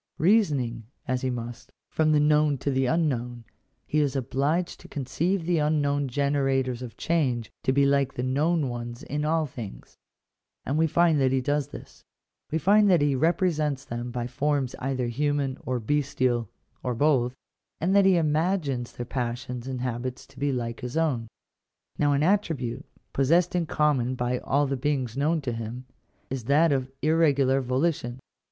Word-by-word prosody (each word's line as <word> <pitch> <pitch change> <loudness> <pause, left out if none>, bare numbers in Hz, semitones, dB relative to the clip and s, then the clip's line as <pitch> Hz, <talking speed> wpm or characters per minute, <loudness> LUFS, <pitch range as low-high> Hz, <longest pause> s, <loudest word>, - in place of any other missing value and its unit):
Seasoning, 145 - +2 0.2
as 130 0 0
he 130 - -1
must, 120 -1 -6 0.2
from 155 -1 +1
the 150 - +4
known 150 -1 +3
to 140 - -2
the 130 -1 +1
unknown, 125 -7 -1 0.4
he 155 - 0
is 145 -2 +1
obliged 140 +7 -1
to - - -13
conceive 165 +7 -1
the 175 -1 +2
unknown 145 -2 +1
generators 135 -2 0
of 125 -2 -8
change 130 -9 0
to - - +1
be 140 +1 +3
like 140 -1 +2
the 125 - -2
known 150 +4 +1
ones 120 +2 -6
in 150 -1 -3
all 160 0 +2
things: 120 -7 -9 0.7
and 145 +3 0
we 160 - +4
find 165 -2 +3
that 130 -1 +3
he 135 - +2
does 145 +1 0
this; - - -12 0.5
we 160 - 0
find 205 +5 +4
that 175 -6 +4
he 145 -1 +2
represents 155 -2 +1
them 120 +1 -5
by 120 0 -3
forms 140 0 -1
either 130 -1 -1
human, 140 +2 0
or 125 -1 0
bestial, 125 -3 0 0.3
or 125 -1 -2
both, 130 -2 +2 0.4
and 185 +4 +1
that 200 - +6
he 190 -2 +5
imagines 155 -5 0
their 120 - -5
passions 125 0 -4
and 130 -2 -4
habits 125 0 -4
to 135 - -17
be 140 0 +1
like 115 -3 -3
his 125 +4 -5
own. 140 -8 0 0.7
Now 145 -1 +3
an 140 +1 +2
attribute, 150 - 0 0.3
possessed 165 +6 +3
in 175 -2 0
common 135 -5 +1
by 125 0 -1
all 145 +1 +1
the 135 0 -1
beings 130 -4 -1
known 155 +4 +1
to 130 -3 -3
him, 115 +2 -6 0.5
is 130 -4 -4
that 150 +5 +4
of 130 -2 0
irregular 140 -4 +3
volition. 130 -1 -1
140 Hz, 170 wpm, -26 LUFS, 125-155 Hz, 0.7 s, that